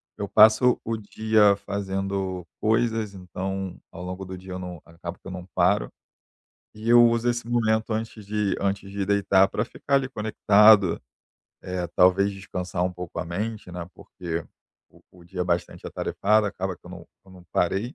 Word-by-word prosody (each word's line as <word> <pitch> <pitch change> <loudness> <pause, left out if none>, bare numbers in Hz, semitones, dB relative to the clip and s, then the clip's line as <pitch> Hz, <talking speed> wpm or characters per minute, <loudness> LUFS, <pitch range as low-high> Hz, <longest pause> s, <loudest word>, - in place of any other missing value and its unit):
eu 100 -2 -5
passo 110 +3 +6
o 115 - -1
dia 110 -1 +3
fazendo 95 -2 -3 0.2
coisas, 110 -2 +1
então 95 0 -5 0.2
ao 90 - -9
longo 90 +1 -6
do 95 0 -7
dia 95 +1 -11
eu 90 - -5
não 90 -2 -7
acabo 85 +1 -8
que - - -44
eu - - -6
não 90 -1 -8
paro. 95 +3 +2 0.8
E 110 +2 -5
eu 120 0 +8
uso 115 +1 +1
esse 120 -1 -2
momento 110 -2 +1
antes 110 -1 -5
de 105 -1 -1
antes 100 0 -2
de 100 -1 -2
deitar 100 -1 +3
pra 105 - -2
ficar 130 +4 -6
ali 135 -1 +1
conectado, 105 -4 +4 0.6
eh, 90 -1 -3
talvez 95 +2 +4
descansar 90 -2 -4
um 90 - -1
pouco 90 -1 -6
a 85 - -4
mente, 105 +3 -4
né. 90 -1 -6
Porque 85 -3 -6 0.5
o - - -21
o 90 -1 -17
dia 90 +1 -4
é - - -3
bastante 85 -1 -2
atarefado, 105 +1 +1
acaba 95 -2 -4
que - - -42
eu 90 - -11
não 90 -2 -10 0.2
eu 95 - -18
não 90 -1 -15
parei. 100 - 0
95 Hz, 180 wpm, -25 LUFS, 90-110 Hz, 0.8 s, eu